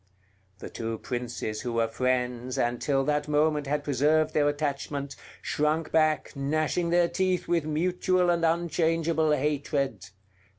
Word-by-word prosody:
The - - -8
two 115 -1 -4
princes 120 -4 -4
who 120 -2 -4
were 115 0 +1
friends, 125 +1 -1
and 120 0 0
till 135 -2 +1
that 150 0 0
moment 150 -1 +1
had 145 +1 -1
preserved 150 +3 +2
their 145 -1 +3
attachment, 140 -1 -3 0.3
shrunk 155 +1 0
back, 155 -1 +1
gnashing 155 +5 0
their 175 0 +4
teeth 185 0 -1
with 170 -3 +1
mutual 180 +3 +1
and 170 -1 0
unchangeable 165 -1 +1
hatred. 140 - -1
150 Hz, 135 wpm, -27 LUFS, 135-160 Hz, 0.3 s, their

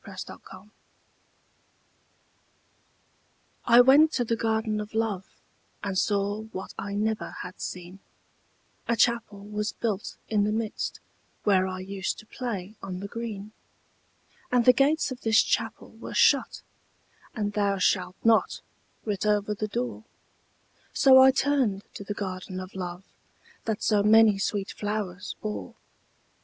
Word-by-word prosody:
THE 195 -3 -11
GARDEN - - -11
OF 190 -1 -13
LOVE 210 - -24 2.9
I 240 0 +8
went 285 +5 +6
to 245 - 0
the 230 - 0
Garden 220 -1 0
of 210 +1 -9
Love, 215 -4 -1 0.6
And 200 -2 -2
saw 205 +1 +1
what 190 -3 -8
I 200 0 -5
never 215 +1 -1
had 180 0 -10
seen; 180 +1 -7 0.9
A 235 - +2
Chapel 230 -3 +1
was 210 +1 -3
built 210 -4 -3
in 210 -2 +2
the 210 - +1
midst, 220 0 -3 0.4
Where 190 -2 +3
I 185 0 -5
used 190 0 -3
to - - -12
play 215 -4 -5
on 185 -2 -5
the 200 - -5
green. 215 -2 -6 1.0
And 245 -2 +3
the 250 - +8
gates 285 +3 +2
of 255 0 -7
this 220 -1 +4
Chapel - - -2
were - - -9
shut, - - +3 0.7
And 205 -2 -2
'Thou 200 -1 +1
shalt 185 0 +1
not' 230 -1 +3 0.4
writ 205 -3 -2
over 210 0 +1
the 215 +1 -3
door; 235 0 -4 0.9
So 265 -1 +7
I 260 0 +9
turned 265 -7 +1
to - - -7
the 205 +1 -5
Garden 185 -1 -5
of 185 0 -8
Love 180 -1 -6 0.6
That 220 -2 -2
so 210 -2 +3
many 215 -1 +6
sweet 200 -1 -2
flowers 205 -3 -4
bore. 215 -1 -5
210 Hz, 145 wpm, -27 LUFS, 195-225 Hz, 2.9 s, I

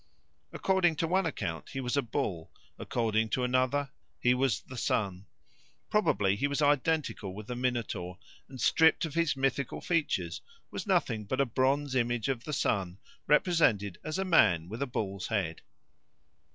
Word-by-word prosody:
According 185 -4 +2
to 165 +2 -1
one 185 +1 +2
account 95 - -4
he 135 - -5
was 125 0 -2
a 140 - +3
bull, 95 -8 -3 0.3
according 110 -1 0
to 125 +4 0
another 130 +2 +1 0.3
he 125 - +4
was 130 -2 +1
the 130 - -11
sun. 100 -5 -1 0.6
Probably 105 - +2
he 140 +7 0
was 140 +1 -2
identical 145 -8 +1
with 105 +1 -8
the 125 - -5
Minotaur, 115 -8 -2 0.3
and 130 -1 -10
stripped 160 +7 +4
of 155 - -6
his 165 -3 +1
mythical 135 0 -1
features 165 -4 -1 0.3
was - - -5
nothing 135 - +1
but 130 +6 -2
a 140 - +4
bronze 135 +3 +1
image 120 -2 0
of 125 -3 -2
the 150 - -4
sun 95 -9 0 0.3
represented 140 - +3
as 155 +3 -3
a 190 - -1
man 95 - +4
with 110 +5 -6
a 140 - 0
bull's 100 -5 -3
head. 95 -8 -2
130 Hz, 165 wpm, -30 LUFS, 105-145 Hz, 0.6 s, he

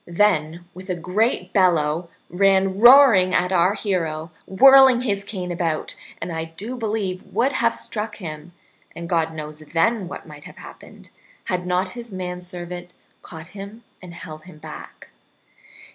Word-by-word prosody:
Then, 170 -3 +1
with 185 +2 -12
a 180 - -1
great 185 +2 -1
bellow, 170 -3 +2 0.2
ran 195 +1 +2
roaring 235 -7 +7
at 180 +1 +1
our 185 +2 +3
hero, 165 -6 -3 0.2
whirling 265 +3 +7
his 200 -5 -1
cane 185 -3 -5
about, 165 -3 -2 0.3
and - - -5
I 160 0 -3
do 195 +10 -7
believe 210 -5 -3
would 240 +7 0
have 235 -3 +1
struck 215 0 -3
him 155 -3 -8 0.4
(and 170 - -7
God 165 -2 0
knows 155 -1 -8
then 175 +7 0
what - - -9
might - - -12
have - - -13
happened) - - -14 0.3
had 180 -2 -3
not 180 +1 0
his 235 +2 -10
manservant 180 -1 -7 0.3
caught 160 -1 -11
him 205 +3 -10 0.2
and 175 -2 -11
held 155 -3 -10
him 180 -4 -14
back. 155 0 -11
180 Hz, 150 wpm, -22 LUFS, 170-210 Hz, 0.4 s, roaring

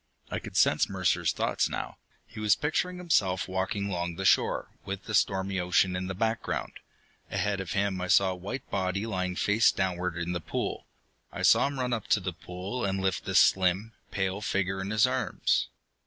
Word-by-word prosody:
I - - -1
could - - -7
sense - - +4
Mercer's - - +1
thoughts - - 0
now. - - -5 0.3
He 110 - -11
was 105 -1 +4
picturing 170 +5 -1
himself 100 - +1
walking 95 +2 -2
long 85 -3 -3
the 95 - -4
shore, - - +2
with 100 0 -5
the 110 - -6
stormy 95 -1 +1
ocean 90 +1 +2
in 90 0 -3
the 95 - -4
background. 110 +3 -2 0.6
Ahead 105 -1 -1
of 95 -4 -4
him 100 -2 0
I 90 - -2
saw 95 +1 +5
the 90 - -3
white 100 +9 -6
body 95 +1 -1
lying 90 -4 -2
face 105 +4 +3
downward 90 -2 -2
in 85 0 -2
the 90 -1 -2
pool. - - -4 0.4
I - - -5
saw - - +5
him 140 -1 -5
run 125 -1 0
up 110 -3 -3
to - - +3
the 90 -2 -4
pool 90 +8 -6
and 95 -1 0
lift 95 -3 -1
the - - -3
slim, 95 +4 +3 0.2
pale 95 0 -2
figure 95 -1 -1
in 95 - -4
his 110 +1 +4
arms. 130 0 0
95 Hz, 195 wpm, -28 LUFS, 90-105 Hz, 0.6 s, saw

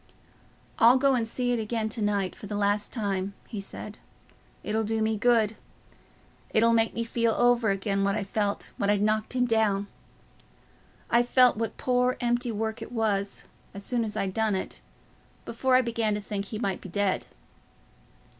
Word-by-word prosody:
"I'll 240 +3 +7
go 275 +1 +3
and 235 -3 0
see 245 +2 -1
it 240 - +1
again 220 0 -2
to 220 +1 -3
night 205 -2 0
for 205 - -10
the 205 - -4
last 205 0 0
time," 200 -3 -2
he 210 -4 -5
said; 205 +2 -8 0.6
"it'll 220 +1 -1
do 220 +1 -1
me 220 0 +1
good; 225 -1 +2 0.9
it'll 230 +1 +3
make 225 0 +2
me 230 - -1
feel 230 0 0
over 240 -2 +3
again 195 0 0
what 200 +1 +1
I 205 - -1
felt 200 +1 -2
when 200 - 0
I'd 205 0 +2
knocked 215 +2 0
him 250 -1 +2
down. 220 -4 +1 1.3
I 235 - +5
felt 250 +1 +4
what 225 0 -3
poor 250 0 +1
empty 240 0 0
work 220 +1 -3
it 225 - -7
was, 210 -4 -1 0.3
as 200 0 -6
soon 240 -2 0
as 215 -2 -4
I'd 190 -1 -1
done 220 -1 +1
it, 190 - -4 0.6
before 255 +2 +1
I 255 - +5
began 225 -3 0
to 210 - -3
think 200 -1 -4
he 215 - -6
might 200 -4 -2
be 190 - -9
dead." 200 +1 0
220 Hz, 180 wpm, -27 LUFS, 205-235 Hz, 1.3 s, I'll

